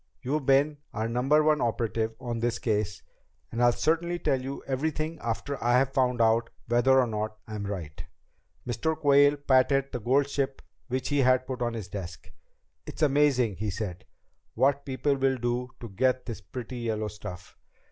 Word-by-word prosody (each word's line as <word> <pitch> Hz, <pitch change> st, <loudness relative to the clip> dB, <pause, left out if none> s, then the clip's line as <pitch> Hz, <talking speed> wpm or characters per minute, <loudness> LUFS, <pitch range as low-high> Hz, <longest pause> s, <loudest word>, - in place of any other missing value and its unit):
You've 140 Hz, +2 st, -2 dB
been 140 Hz, +2 st, +4 dB, 0.2 s
our 110 Hz, +1 st, -1 dB
Number 135 Hz, +6 st, +3 dB
One 150 Hz, -1 st, +3 dB
operative 115 Hz, -1 st, -1 dB
on 120 Hz, -3 st, -4 dB
this 120 Hz, 0 st, 0 dB
case, 105 Hz, -2 st, -1 dB, 0.5 s
and 115 Hz, -, -2 dB
I'll 120 Hz, 0 st, +6 dB
certainly 165 Hz, +6 st, 0 dB
tell 135 Hz, -6 st, 0 dB
you 135 Hz, +2 st, -6 dB
everything 155 Hz, +4 st, -2 dB
after 115 Hz, +4 st, -3 dB
I've 125 Hz, +3 st, +3 dB
found 125 Hz, -3 st, +1 dB
out 115 Hz, 0 st, +3 dB, 0.2 s
whether 120 Hz, +3 st, +4 dB
or 130 Hz, -, +4 dB
not 110 Hz, -1 st, -3 dB
I'm 105 Hz, -2 st, -5 dB
right." 85 Hz, -5 st, -6 dB, 0.6 s
Mr. 155 Hz, +6 st, -1 dB
Quayle 145 Hz, -1 st, +5 dB
patted 135 Hz, 0 st, +2 dB
the 125 Hz, -, -3 dB
gold 135 Hz, +5 st, +2 dB
ship 140 Hz, -1 st, -2 dB, 0.2 s
which 130 Hz, 0 st, -2 dB
he 145 Hz, -1 st, +1 dB
had 130 Hz, -1 st, +4 dB
put 130 Hz, -1 st, -5 dB
on 120 Hz, -1 st, -1 dB
his 110 Hz, -5 st, -5 dB
desk. 95 Hz, -3 st, -8 dB, 0.6 s
"It's -, -, -4 dB
amazing," 135 Hz, -, +3 dB
he 105 Hz, +1 st, -2 dB
said 95 Hz, -2 st, -5 dB, 0.5 s
"what 140 Hz, +4 st, +2 dB
people 140 Hz, +1 st, 0 dB
will 135 Hz, -1 st, +1 dB
do 120 Hz, +1 st, -2 dB
to 115 Hz, -, -8 dB
get 130 Hz, +6 st, +1 dB
this 115 Hz, -3 st, -6 dB
pretty 125 Hz, 0 st, -7 dB
yellow 110 Hz, -2 st, -2 dB
stuff. 90 Hz, -4 st, -9 dB
125 Hz, 170 wpm, -28 LUFS, 115-140 Hz, 0.6 s, I'll